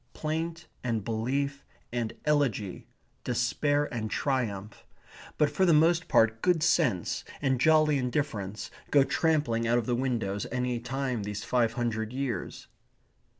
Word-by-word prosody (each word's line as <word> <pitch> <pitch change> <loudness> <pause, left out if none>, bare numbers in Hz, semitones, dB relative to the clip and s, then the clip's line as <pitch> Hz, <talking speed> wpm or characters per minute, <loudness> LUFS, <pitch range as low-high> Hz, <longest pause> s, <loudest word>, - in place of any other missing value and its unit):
Plaint 160 +1 -3 0.2
and 115 -4 -1
belief 140 +5 -1 0.3
and 120 -2 -1
elegy, 135 -10 0 0.4
despair 145 +5 +1
and 110 -2 -3
triumph, 110 -7 -2 0.5
but 150 - +3
for 190 - +1
the 170 -4 +5
most 165 +3 +3
part 115 0 +3
good 175 -4 +2
sense 140 - +1 0.2
and 130 -3 0
jolly 155 -2 +4
indifference, 120 -6 -3 0.2
go 140 -2 +5
trampling 140 -8 +1
out 120 +1 +3
of 120 - 0
the 125 - 0
windows 120 -6 -1
any 125 -1 -1
time 130 -1 -2
these 105 0 -4
five 120 -3 +1
hundred 115 -2 -2
years. 130 -2 -4
125 Hz, 135 wpm, -29 LUFS, 115-145 Hz, 0.5 s, the